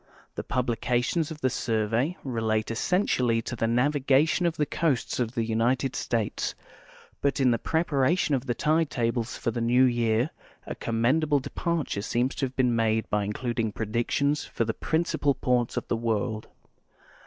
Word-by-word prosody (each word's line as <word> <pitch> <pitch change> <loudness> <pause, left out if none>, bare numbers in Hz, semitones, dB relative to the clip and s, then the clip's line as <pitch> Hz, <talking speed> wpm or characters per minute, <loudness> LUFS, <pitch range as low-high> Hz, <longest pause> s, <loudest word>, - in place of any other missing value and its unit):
The - - -5
pub 125 -1 -1
lications 125 +6 0
of 160 -2 -8
the 130 - +3
Survej'' 115 +5 0
relate 110 -4 -1
essentially 125 - +1
to 120 - -4
the 115 -1 0
navigation 140 +6 +2
of 165 -1 -2
the 150 - +2
coasts 145 -5 -1
of 120 -1 -1
the 115 - +1
United 120 +3 0
States; 115 -4 -2 0.7
but 140 0 +1
in 130 -2 +4
the 115 - +1
preparation 160 0 +1
of 135 0 -1
the 120 - 0
tide 155 +4 +1
tables 115 -1 -1
for 115 - -1
the 115 - -3
new 120 +2 +4
year 120 +1 +2 0.3
a - - -4
commendable 140 +6 +1
departure 155 -5 -2
seems 120 +5 0
to 135 - 0
have 130 - -14
been 125 -2 +2
made 110 -1 +1
by 105 -1 +1
includ 120 +3 -3
ing 110 -2 0
]>redictions 120 +7 -1
for 115 - -1
the 110 - -1
principal 160 -2 0
ports 125 -2 0
of - - -2
the - - 0
w'orld. 110 -1 -1
125 Hz, 170 wpm, -27 LUFS, 115-140 Hz, 0.7 s, in